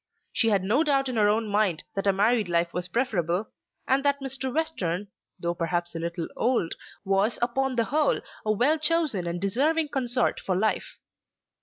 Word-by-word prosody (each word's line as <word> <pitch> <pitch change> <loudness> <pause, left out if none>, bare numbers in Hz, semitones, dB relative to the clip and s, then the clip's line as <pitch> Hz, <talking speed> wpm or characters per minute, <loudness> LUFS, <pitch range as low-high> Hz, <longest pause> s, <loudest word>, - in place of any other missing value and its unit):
She 225 - +2
had 200 -3 +2
no 230 +11 +3
doubt 275 -3 +1
in 250 - -3
her 210 -2 +4
own 220 +1 +1
mind 205 -5 +1
that 195 0 -2
a - - +6
married 210 +1 +2
life 170 0 +1
was 180 0 -2
preferable, 190 -4 -1 0.4
and 270 +1 +2
that 280 0 +2
Mr. 270 -1 -3
Western, 205 - -2 0.3
though 170 0 -1
perhaps 175 0 -2
a 165 - -4
little 170 0 -3
old, 235 -9 +1 0.3
was 195 +4 +2
upon 260 +2 0
the 230 - +2
whole 295 +5 +1 0.2
a 215 - +1
well 270 +9 +2
chosen 310 - +1
and 170 +1 -2
deserving 290 - +1
consort 250 -3 0
for 185 - -1
life. 215 +4 -1
220 Hz, 180 wpm, -26 LUFS, 180-270 Hz, 0.4 s, a